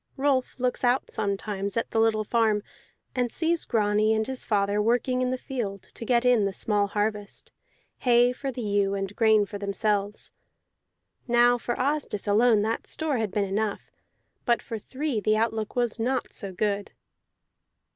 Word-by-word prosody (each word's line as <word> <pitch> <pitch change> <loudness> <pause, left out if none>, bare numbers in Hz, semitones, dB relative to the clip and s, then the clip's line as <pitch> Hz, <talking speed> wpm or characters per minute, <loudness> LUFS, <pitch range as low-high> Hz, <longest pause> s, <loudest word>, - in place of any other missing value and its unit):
Rolf 270 -2 0
looks 250 +1 0
out 250 +1 +1
sometimes 200 0 -2
at 230 - -1
the 225 - +1
little 220 -1 +2
farm, 215 -2 +1 0.5
and 245 -2 0
sees 335 +3 0
Grani 215 -1 +2
and 220 0 0
his 265 +1 -3
father 205 -1 +1
working 245 +3 +1
in 255 - +1
the 255 - -1
field 220 -8 -5
to - - -10
get 240 +1 +2
in 245 -5 +4
the 195 - -1
small 205 0 0
harvest, 210 0 -3 0.5
hay 245 0 +4
for 270 +1 -4
the 245 -1 -5
ewe 200 -1 +1
and 195 0 -4
grain 220 -2 +4
for 205 0 -7
themselves. 205 0 -1 1.0
Now 240 0 +4
for 240 0 -2
Asdis 275 -7 -1
alone 215 +1 +4
that 225 +1 -2
store 305 -6 0
had 220 -2 -1
been 200 +1 0
enough, 205 +1 -2 0.5
but 235 -2 +2
for 225 - -5
three 265 +1 -3
the 215 +1 +2
outlook 220 -1 -1
was 240 -2 0
not 250 +2 -1
so 200 -2 -3
good. 200 +2 -2
220 Hz, 165 wpm, -26 LUFS, 205-245 Hz, 1.0 s, in